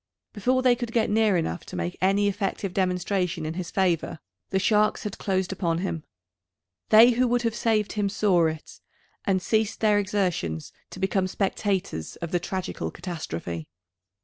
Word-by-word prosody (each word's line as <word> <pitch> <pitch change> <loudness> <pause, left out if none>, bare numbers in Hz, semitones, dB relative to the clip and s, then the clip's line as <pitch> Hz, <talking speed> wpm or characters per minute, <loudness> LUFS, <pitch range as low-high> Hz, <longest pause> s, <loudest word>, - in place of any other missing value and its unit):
Before 255 +5 +1
they 250 -1 +5
could 240 -1 -5
get 225 -2 +2
near 215 -3 +3
enough 120 - -2
to - - -8
make 85 0 -3
any 195 +2 +3
effective 195 -1 -2
demonstration 180 -2 0
in 155 - -3
his 180 0 -5
favour, 175 -3 0 0.3
the 190 - +1
sharks 210 +2 +2
had 210 - -5
closed 190 -2 0
upon 170 -3 0
him. 170 -3 -3 0.9
They 225 +3 +8
who 250 +1 +2
would 245 0 +1
have 230 -1 0
saved 220 -3 +1
him 205 -2 0
saw 185 -5 +3
it, 160 0 -6 0.5
and 190 -3 +1
ceased 220 +3 0
their 210 -2 +4
exertions 180 - -1 0.2
to - - -10
become 190 0 +1
spectators 190 - -2
of 170 -1 -6
the 175 - +2
tragical 185 +1 -4
catastrophe. 85 - -5
190 Hz, 165 wpm, -26 LUFS, 175-210 Hz, 0.9 s, They